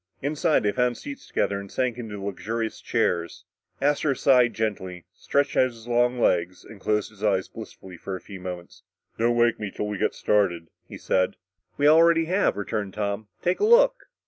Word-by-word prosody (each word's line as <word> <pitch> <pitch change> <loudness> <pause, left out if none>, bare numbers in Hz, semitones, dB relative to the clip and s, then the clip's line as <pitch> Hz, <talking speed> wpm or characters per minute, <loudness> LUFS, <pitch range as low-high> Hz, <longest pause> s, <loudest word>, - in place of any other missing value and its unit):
Inside 150 0 +1
they 105 - +2
found 125 +1 0
seats 285 -1 -9
together 100 0 -1
and 100 -1 -10
sank 125 -3 -1
into 110 -3 -6
the 100 - -8
luxurious 110 +3 -4
chairs. 85 -1 -1 0.3
Astro 145 0 +1
sighed 125 -4 +4
gently, 95 -5 -3
stretched 140 0 0
out - - +5
his 115 -2 -12
long 120 +1 +2
legs 90 -4 +1
and 100 - -13
closed 105 0 0
his 105 0 -14
eyes 95 -3 +1
blissfully 90 -2 -11
for 95 +3 -5
a - - -6
few 100 0 -10
moments. 90 -1 -8 0.4
"Don't 120 +1 +2
wake 120 -1 +3
me 105 -2 -4
till 105 - -4
we 105 -2 -4
get - - 0
started," 90 -6 +1 0.2
he - - -9
said. 95 -1 0 0.4
"We 145 - +3
already 165 +1 +5
have," 185 - +1
returned 100 -1 -3
Tom. 105 0 -3 0.2
"Take 180 +1 +1
a - - 0
look." - - +4
110 Hz, 190 wpm, -25 LUFS, 100-130 Hz, 0.4 s, out